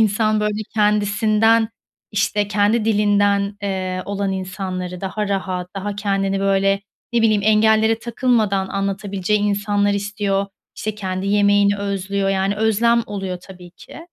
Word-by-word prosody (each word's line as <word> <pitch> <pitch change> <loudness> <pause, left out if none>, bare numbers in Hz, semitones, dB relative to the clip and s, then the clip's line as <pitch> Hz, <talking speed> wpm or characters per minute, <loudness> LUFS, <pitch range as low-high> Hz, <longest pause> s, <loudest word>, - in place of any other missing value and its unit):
insan, 215 0 +2
böyle, 210 0 -1
kendisinden, 215 +1 +3 0.4
işte, 205 0 0
kendi 210 +2 +2
dilinden, 205 -1 +2
eee, 185 -2 -2
olan 200 -1 -2
insanları, 185 -1 -5
daha 200 +2 -3
rahat, 185 -2 -2
daha 200 +1 -4
kendini, 195 -1 -1
böyle, 195 0 +2 0.3
ne 235 - +2
bileyim, 215 -2 +3
engellere 220 +1 +4
takılmadan 225 -5 0
anlatabileceği 195 +1 -1
insanlar 205 0 +1
istiyor, 200 0 -1 0.3
işte, 215 -1 -3
kendi 190 -2 -4
yemeğini 205 0 +3
özlüyor. 200 0 -2
Yani, 195 +1 0
özlem 230 +2 +2
oluyor 195 -3 -4
tabii 180 -2 -13
ki. - - -13
200 Hz, 125 wpm, -20 LUFS, 195-210 Hz, 0.4 s, engellere